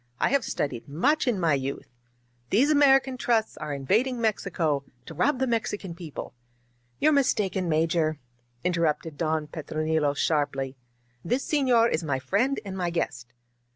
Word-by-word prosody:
I -, -, +2 dB
have 280 Hz, -3 st, +2 dB
studied 130 Hz, -5 st, -3 dB
much 270 Hz, -, +1 dB
in 230 Hz, -6 st, +1 dB
my 165 Hz, -4 st, +2 dB
youth. 135 Hz, -2 st, -3 dB, 0.6 s
These 265 Hz, +9 st, +3 dB
American 270 Hz, -3 st, +4 dB
trusts 230 Hz, -3 st, +1 dB
are 150 Hz, -, -6 dB
invad 150 Hz, -, +1 dB
ing 250 Hz, -2 st, -4 dB
Mexico 175 Hz, -10 st, 0 dB, 0.2 s
to -, -, -9 dB
rob 265 Hz, -, +1 dB
the 265 Hz, -, +1 dB
Mexican 210 Hz, -6 st, -2 dB
people 165 Hz, -8 st, -8 dB, 0.3 s
" 120 Hz, 0 st, -41 dB
"You're 310 Hz, -, +4 dB
mistaken, 200 Hz, -, +1 dB
Major," 160 Hz, 0 st, +1 dB, 0.5 s
interrupted 165 Hz, -3 st, 0 dB
Don 155 Hz, -1 st, -1 dB
Petro 155 Hz, 0 st, -5 dB
nilo 155 Hz, -2 st, +1 dB
sharply. 140 Hz, -3 st, 0 dB, 0.5 s
This 250 Hz, +4 st, 0 dB
senor 260 Hz, -8 st, +3 dB
is 165 Hz, -, -1 dB
my 140 Hz, -4 st, 0 dB
friend 220 Hz, -, 0 dB
and 190 Hz, -1 st, -5 dB
my 180 Hz, -2 st, -1 dB
guest." 125 Hz, -8 st, -3 dB
170 Hz, 155 wpm, -26 LUFS, 150-240 Hz, 0.6 s, American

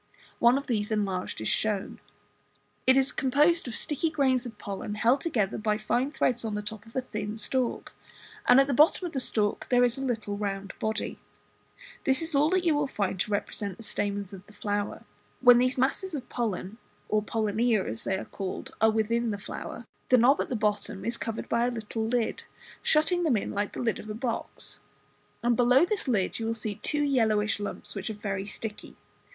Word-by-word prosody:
One 240 Hz, +2 st, +6 dB
of 280 Hz, -, -4 dB
these 210 Hz, -5 st, -1 dB
enlarged 195 Hz, -, -2 dB
is 110 Hz, -, -2 dB
shown. 210 Hz, -3 st, 0 dB, 0.9 s
It 260 Hz, +1 st, +7 dB
is 270 Hz, 0 st, +3 dB
composed 295 Hz, +5 st, +3 dB
of 235 Hz, -, -4 dB
sticky 310 Hz, +2 st, 0 dB
grains 265 Hz, -5 st, +1 dB
of 225 Hz, -3 st, -10 dB
pollen 200 Hz, +1 st, -5 dB
held 240 Hz, +6 st, +3 dB
together 215 Hz, -, 0 dB
by 215 Hz, -1 st, +1 dB
fine 240 Hz, +5 st, 0 dB
threads 245 Hz, -5 st, +1 dB
on 220 Hz, -2 st, -2 dB
the 210 Hz, -, -3 dB
top 215 Hz, 0 st, -7 dB
of 225 Hz, -, -17 dB
a 260 Hz, -, +1 dB
thin 210 Hz, -3 st, -5 dB
stalk; 250 Hz, +3 st, -1 dB, 0.5 s
and 250 Hz, +2 st, +8 dB
at 275 Hz, -, +6 dB
the 275 Hz, -, -1 dB
bottom 305 Hz, +7 st, +5 dB
of 345 Hz, -, -3 dB
the 270 Hz, -, 0 dB
stalk 210 Hz, -4 st, 0 dB
there 245 Hz, -1 st, +5 dB
is 245 Hz, +1 st, +1 dB
a -, -, -3 dB
little 220 Hz, -5 st, -2 dB
round 195 Hz, -1 st, -3 dB
body. 220 Hz, 0 st, -2 dB, 0.8 s
This 265 Hz, +4 st, +2 dB
is 325 Hz, 0 st, -3 dB
all 290 Hz, +2 st, +4 dB
that 370 Hz, 0 st, +2 dB
you 330 Hz, -, +4 dB
will 290 Hz, -1 st, +1 dB
find 200 Hz, -7 st, -2 dB
to 200 Hz, -, -1 dB
represent 200 Hz, -1 st, -2 dB
the -, -, -11 dB
stamens 205 Hz, -2 st, -2 dB
of 190 Hz, -1 st, -9 dB
the 210 Hz, -, -16 dB
flower. 205 Hz, 0 st, -3 dB, 0.4 s
When 245 Hz, -1 st, +8 dB
these 255 Hz, +1 st, +2 dB
masses 300 Hz, +7 st, 0 dB
of 255 Hz, -4 st, -6 dB
pollen, 220 Hz, -2 st, -3 dB, 0.3 s
or 215 Hz, 0 st, +2 dB
pollinia 220 Hz, 0 st, +1 dB
as 110 Hz, +1 st, -4 dB
they 190 Hz, -, 0 dB
are -, -, -5 dB
called, 195 Hz, -2 st, -5 dB
are 220 Hz, -, +6 dB
within 225 Hz, +2 st, +1 dB
the 205 Hz, -, -2 dB
flower, 225 Hz, +3 st, -7 dB, 0.2 s
the 255 Hz, -, +7 dB
knob 255 Hz, +4 st, +5 dB
at -, -, -3 dB
the 255 Hz, -, -1 dB
bottom 210 Hz, -2 st, -1 dB
is 235 Hz, -, 0 dB
covered 225 Hz, -1 st, -4 dB
by 235 Hz, +1 st, +2 dB
a -, -, 0 dB
little 220 Hz, -1 st, -3 dB
lid, 240 Hz, -1 st, 0 dB, 0.4 s
shutting 320 Hz, +3 st, +3 dB
them 300 Hz, -9 st, +3 dB
in -, -, -3 dB
like 205 Hz, 0 st, -1 dB
the -, -, -6 dB
lid 230 Hz, -3 st, 0 dB
of 215 Hz, -, -9 dB
a 210 Hz, -, -4 dB
box, 230 Hz, 0 st, -3 dB, 0.6 s
and 240 Hz, -, +3 dB
just -, -, -1 dB
below 250 Hz, +6 st, +5 dB
this 400 Hz, -4 st, -2 dB
lid 210 Hz, -6 st, 0 dB
you 225 Hz, -, -2 dB
will 230 Hz, -, 0 dB
see 215 Hz, -2 st, -5 dB
two 295 Hz, -1 st, 0 dB
yellowish 220 Hz, -7 st, +2 dB
lumps, 205 Hz, -, -5 dB
which 195 Hz, 0 st, -4 dB
are 220 Hz, -, -4 dB
very 200 Hz, -1 st, -3 dB
sticky. 210 Hz, 0 st, -7 dB
225 Hz, 210 wpm, -28 LUFS, 210-260 Hz, 0.9 s, and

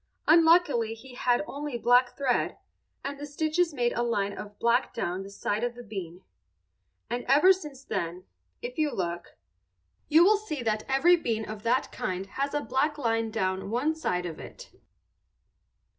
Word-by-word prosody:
Unluckily 320 Hz, -9 st, +5 dB
he 255 Hz, +3 st, -13 dB
had 245 Hz, +1 st, +1 dB
only 290 Hz, -3 st, -5 dB
black 245 Hz, +1 st, +3 dB
thread, 270 Hz, -3 st, 0 dB, 0.5 s
and 280 Hz, 0 st, -5 dB
the 290 Hz, -, -5 dB
stitches 315 Hz, +4 st, 0 dB
made 245 Hz, -4 st, 0 dB
a -, -, -1 dB
line 205 Hz, -4 st, 0 dB
of 205 Hz, +1 st, -9 dB
black 235 Hz, +2 st, +1 dB
down 185 Hz, -5 st, -2 dB
the 195 Hz, -, -8 dB
side 205 Hz, +2 st, -2 dB
of 240 Hz, 0 st, -2 dB
the 245 Hz, -, -9 dB
bean. 190 Hz, -5 st, -7 dB, 0.8 s
And 245 Hz, +1 st, -3 dB
ever 300 Hz, +9 st, +6 dB
since 295 Hz, -8 st, -9 dB
then, 180 Hz, -7 st, -3 dB, 0.4 s
if 485 Hz, -6 st, -5 dB
you 305 Hz, -2 st, +2 dB
look, 175 Hz, -6 st, -4 dB, 0.7 s
you 320 Hz, +3 st, +7 dB
will 415 Hz, +3 st, +5 dB
see 315 Hz, -, -5 dB
that 215 Hz, -1 st, 0 dB
every 335 Hz, +7 st, +5 dB
bean 225 Hz, -8 st, -2 dB
of 215 Hz, -1 st, -7 dB
that 240 Hz, +4 st, +1 dB
kind 185 Hz, +1 st, -3 dB
has 275 Hz, +8 st, -3 dB
a 295 Hz, -, +1 dB
black 295 Hz, +3 st, 0 dB
line 225 Hz, -4 st, 0 dB
down 190 Hz, -3 st, -2 dB
one 255 Hz, +8 st, +1 dB
side 180 Hz, -, -2 dB
of 165 Hz, -3 st, -6 dB
it. -, -, -11 dB
245 Hz, 170 wpm, -28 LUFS, 210-295 Hz, 0.8 s, you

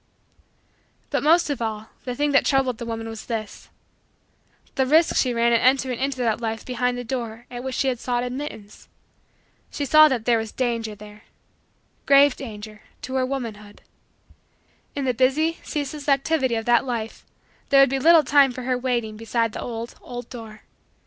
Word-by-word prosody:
But -, -, 0 dB
most 325 Hz, 0 st, +3 dB
of 275 Hz, -, -4 dB
all, 220 Hz, -1 st, -4 dB, 0.2 s
the 250 Hz, -1 st, -3 dB
thing 290 Hz, +2 st, 0 dB
that 280 Hz, -, +4 dB
troubled 265 Hz, -4 st, +1 dB
the 235 Hz, -, -6 dB
woman 225 Hz, 0 st, -4 dB
was 225 Hz, -1 st, -8 dB
this: 220 Hz, -3 st, -5 dB, 1.0 s
the 265 Hz, -1 st, 0 dB
risk 315 Hz, +4 st, +4 dB
she 255 Hz, -, +2 dB
ran 235 Hz, 0 st, +2 dB
in 230 Hz, -, +4 dB
entering 255 Hz, -1 st, +2 dB
into 270 Hz, 0 st, -1 dB
that 235 Hz, -2 st, 0 dB
life 225 Hz, -1 st, -4 dB
behind 250 Hz, 0 st, -1 dB
the 245 Hz, -, -4 dB
door 235 Hz, -1 st, -5 dB
at 245 Hz, 0 st, -6 dB
which 265 Hz, -1 st, -4 dB
she 270 Hz, -, 0 dB
had 250 Hz, -3 st, -1 dB
sought 245 Hz, -1 st, -1 dB
admittance. 250 Hz, -5 st, -7 dB, 0.8 s
She 285 Hz, -, -4 dB
saw 310 Hz, +3 st, +7 dB
that 250 Hz, -6 st, -2 dB
there 235 Hz, -2 st, +3 dB
was 220 Hz, -1 st, -5 dB
danger 230 Hz, -4 st, -2 dB
there 210 Hz, 0 st, -14 dB, 0.8 s
grave 280 Hz, -1 st, +6 dB
danger 215 Hz, -4 st, -9 dB, 0.2 s
to 260 Hz, -, -6 dB
her 260 Hz, -1 st, +1 dB
womanhood. 220 Hz, -6 st, -6 dB, 1.1 s
In 280 Hz, -1 st, -2 dB
the 255 Hz, -, +1 dB
busy, 285 Hz, +7 st, +1 dB
ceaseless, 290 Hz, 0 st, -4 dB
activity 275 Hz, -2 st, +1 dB
of 225 Hz, 0 st, -3 dB
that 240 Hz, 0 st, +4 dB
life 230 Hz, -3 st, -5 dB, 0.5 s
there 275 Hz, -, +5 dB
would 275 Hz, -1 st, +6 dB
be 270 Hz, -, 0 dB
little 325 Hz, +2 st, +6 dB
time 280 Hz, -1 st, +4 dB
for 255 Hz, +1 st, -7 dB
her 250 Hz, 0 st, -1 dB
waiting 240 Hz, -4 st, -2 dB
beside 230 Hz, 0 st, -1 dB
the -, -, -6 dB
old, 230 Hz, 0 st, -6 dB
old, 245 Hz, -1 st, -8 dB
door. 225 Hz, -3 st, -10 dB
245 Hz, 180 wpm, -23 LUFS, 225-270 Hz, 1.1 s, saw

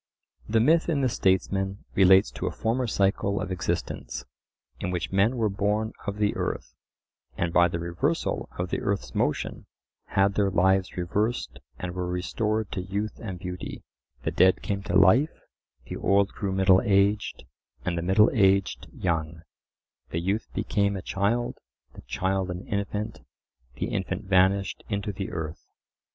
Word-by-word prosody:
The 110 Hz, +1 st, +3 dB
myth 160 Hz, +9 st, +4 dB
in 150 Hz, -4 st, +1 dB
the 130 Hz, -, +2 dB
Statesman 95 Hz, 0 st, 0 dB
relates 95 Hz, 0 st, +6 dB
to -, -, -4 dB
a -, -, -1 dB
former 120 Hz, +3 st, -1 dB
cycle 100 Hz, -1 st, +1 dB
of -, -, -4 dB
existence, 90 Hz, -2 st, -3 dB, 0.5 s
in -, -, -2 dB
which 90 Hz, -1 st, -2 dB
men 100 Hz, +6 st, +3 dB
were 110 Hz, -2 st, +2 dB
born 105 Hz, +2 st, 0 dB
of 100 Hz, 0 st, -2 dB
the 105 Hz, -1 st, +1 dB
earth, -, -, -3 dB, 0.6 s
and 85 Hz, 0 st, -1 dB
by 85 Hz, 0 st, +6 dB
the 85 Hz, 0 st, -3 dB
reversal 85 Hz, 0 st, -1 dB
of 90 Hz, 0 st, -3 dB
the -, -, -1 dB
earth's 100 Hz, -1 st, -2 dB
motion -, -, -1 dB, 0.4 s
had 100 Hz, 0 st, +2 dB
their 100 Hz, 0 st, +2 dB
lives 95 Hz, 0 st, +2 dB
reversed 105 Hz, +7 st, -1 dB, 0.2 s
and 90 Hz, -1 st, -5 dB
were 90 Hz, 0 st, -3 dB
restored 105 Hz, +4 st, -1 dB
to 95 Hz, -, -2 dB
youth 100 Hz, +4 st, -4 dB
and 95 Hz, -5 st, -5 dB
beauty: 90 Hz, 0 st, -6 dB, 0.4 s
the -, -, -1 dB
dead 95 Hz, 0 st, +4 dB
came 100 Hz, -1 st, -2 dB
to 95 Hz, -, +2 dB
life, 115 Hz, -, +4 dB, 0.4 s
the -, -, -6 dB
old 100 Hz, 0 st, +3 dB
grew 100 Hz, -3 st, -3 dB
middle 95 Hz, 0 st, +5 dB
aged, 100 Hz, -1 st, +2 dB, 0.4 s
and 90 Hz, -, 0 dB
the 85 Hz, -, -1 dB
middle 95 Hz, +5 st, +4 dB
aged 100 Hz, -4 st, +2 dB
young; 80 Hz, -2 st, -2 dB, 0.7 s
the 80 Hz, -, -2 dB
youth 100 Hz, +6 st, -1 dB
became 100 Hz, -2 st, +1 dB
a 95 Hz, -, -7 dB
child, 115 Hz, +5 st, -1 dB, 0.3 s
the -, -, -11 dB
child 95 Hz, 0 st, -1 dB
an 90 Hz, +1 st, -5 dB
infant, 100 Hz, +1 st, -3 dB, 0.6 s
the -, -, -2 dB
infant -, -, -2 dB
vanished 95 Hz, +1 st, +2 dB
into 100 Hz, +1 st, -2 dB
the 95 Hz, 0 st, -5 dB
earth. 80 Hz, -2 st, -5 dB
95 Hz, 160 wpm, -27 LUFS, 90-105 Hz, 0.7 s, relates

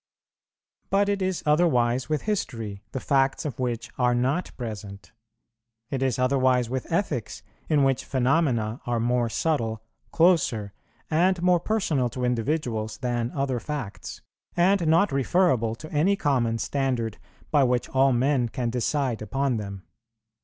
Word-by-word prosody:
But 200 Hz, +1 st, +2 dB
it 200 Hz, -1 st, 0 dB
is 185 Hz, -1 st, -1 dB
otherwise 130 Hz, -6 st, +2 dB
with 155 Hz, -2 st, -1 dB
history, 115 Hz, -, -3 dB
the 130 Hz, -, -3 dB
facts 135 Hz, +3 st, +1 dB
of 140 Hz, -5 st, -4 dB
which 120 Hz, -3 st, -3 dB
are 125 Hz, -1 st, +3 dB
not 135 Hz, +8 st, 0 dB
present; 100 Hz, -6 st, -7 dB, 0.8 s
it 135 Hz, -2 st, -2 dB
is 130 Hz, -3 st, +1 dB
otherwise 130 Hz, -2 st, +2 dB
with 130 Hz, +4 st, -4 dB
ethics, 125 Hz, -, -2 dB, 0.3 s
in 150 Hz, -3 st, +3 dB
which 135 Hz, -1 st, +1 dB
phenomena 130 Hz, -4 st, +1 dB
are 120 Hz, -1 st, 0 dB
more 120 Hz, 0 st, +1 dB
subtle, 115 Hz, -6 st, -1 dB, 0.3 s
closer, 140 Hz, -, +2 dB, 0.4 s
and 180 Hz, +3 st, +3 dB
more 180 Hz, -1 st, +4 dB
personal 165 Hz, -, 0 dB
to 125 Hz, +1 st, -3 dB
individuals 115 Hz, -3 st, -1 dB
than 120 Hz, -1 st, -1 dB
other 135 Hz, -3 st, -1 dB
facts, 135 Hz, -4 st, -6 dB, 0.3 s
and 180 Hz, 0 st, +3 dB
not 165 Hz, +3 st, +4 dB
referable 135 Hz, -5 st, +2 dB
to 155 Hz, +7 st, -11 dB
any 165 Hz, +7 st, +3 dB
common 125 Hz, -9 st, +1 dB
standard 125 Hz, -4 st, -2 dB, 0.3 s
by 145 Hz, -3 st, +4 dB
which 125 Hz, -1 st, +1 dB
all 135 Hz, +1 st, +3 dB
men 125 Hz, 0 st, +1 dB
can 120 Hz, 0 st, -2 dB
decide 125 Hz, 0 st, -1 dB
upon 130 Hz, +4 st, -1 dB
them. 100 Hz, -3 st, -6 dB
130 Hz, 140 wpm, -25 LUFS, 115-155 Hz, 0.8 s, more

